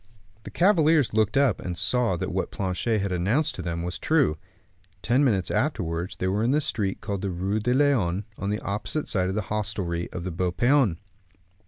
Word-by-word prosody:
The - - -6
cavaliers 165 - +3
looked 110 +2 +2
up, 140 -1 +3
and 90 -1 -5
saw 120 -5 +1
that - - -3
what - - -2
Planchet 100 +3 -1
had 100 -1 -2
announced 100 - +1
to - - -6
them 85 -1 -3
was 90 +1 -4
true. 150 - +2 0.7
Ten 125 +8 +3
minutes 100 -9 +1
afterwards 90 - -1
they - - -3
were 100 +3 0
in 115 - +1
the 145 +3 +3
street 105 -9 -2
called 100 -2 -3
the 100 - -2
Rue 95 +4 -1
de 120 +3 0
Lyon, 110 -10 +2
on 100 - -4
the 105 +1 -2
opposite 105 +9 -3
side 95 -3 0
of 95 - -2
the 105 - 0
hostelry 95 -5 -2
of 90 - -5
the 90 - -3
Beau 90 +2 -1
Paon. 120 - +3
100 Hz, 200 wpm, -25 LUFS, 90-125 Hz, 0.7 s, cavaliers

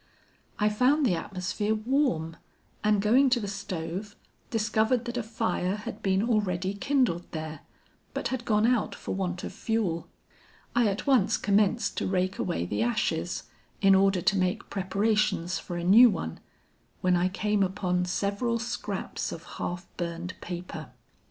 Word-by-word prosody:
I 210 - +2
found 255 +8 +3
the 210 - +3
atmosphere 190 +4 -2
warm, 215 - 0 0.5
and 210 -2 +3
going 255 +6 +5
to 245 -1 +3
the 205 - -4
stove, 195 0 -5 0.3
discovered 220 +2 +1
that 240 0 -4
a 245 - 0
fire 220 -4 -1
had 210 0 -7
been 195 0 +2
already 195 -4 0
kindled 235 -6 0
there, 155 -1 -5 0.6
but - - -1
had 260 -2 -3
gone 215 -2 +2
out 240 -2 +1
for - - -5
want 180 -2 -2
of - - -5
fuel. 205 -7 -1 0.7
I 240 -2 +4
at 200 0 -2
once 260 -9 +4
commenced 205 +1 +2
to - - 0
rake 185 0 0
away 85 +1 -1
the 105 +4 -2
ashes, 120 +1 0 0.4
in 195 -1 +6
order 190 -2 +4
to 200 - +3
make 185 0 -1
preparations 195 -2 +1
for 175 - -6
a 170 - -3
new 225 +8 +8
one, 165 - -4 0.6
when 180 -1 +3
I 175 +1 +2
came 210 +2 0
upon 180 -1 0
several 200 +6 0
scraps 240 +1 -4
of - - -7
half 175 0 -5
burned 175 +1 -4
paper. 175 -3 -6
200 Hz, 155 wpm, -28 LUFS, 180-220 Hz, 0.7 s, new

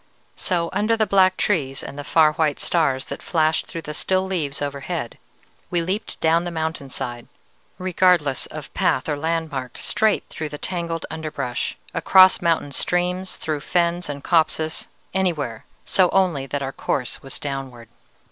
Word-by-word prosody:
"So 170 -3 0
under 225 +2 +2
the 220 - +3
black 190 -2 +4
trees 135 -9 0
and - - -7
the 145 - -5
far 155 +1 +4
white 155 -2 +1
stars 140 -6 +1
that - - -7
flashed 160 -2 +1
through 165 - -6
the 150 - -5
still 185 +4 0
leaves 160 -7 -2
overhead, 145 -1 -4 0.5
we 175 -1 +1
leaped 195 +6 -3
down 165 +1 +3
the 175 - -3
mountain 160 -4 -3
side, 120 -2 -5 0.5
regardless 180 -6 +2
of - - -8
path 130 - +1
or 150 - 0
landmark, 150 -4 -2
straight 220 -1 +1
through 155 -1 -5
the 150 - -6
tangled 170 -1 -3
underbrush, 155 -6 -3 0.2
across 185 0 +6
mountain 165 -4 +1
streams, 180 +5 -1
through 155 -2 -2
fens 175 +1 0
and 140 -1 -5
copses, 160 -1 +1 0.3
anywhere, 155 - -1 0.2
so 185 -2 +4
only 175 -8 +2
that 140 +2 -2
our 135 0 -3
course 125 -3 -2
was 135 - -7
downward. 135 -4 -5
160 Hz, 155 wpm, -23 LUFS, 140-180 Hz, 0.5 s, across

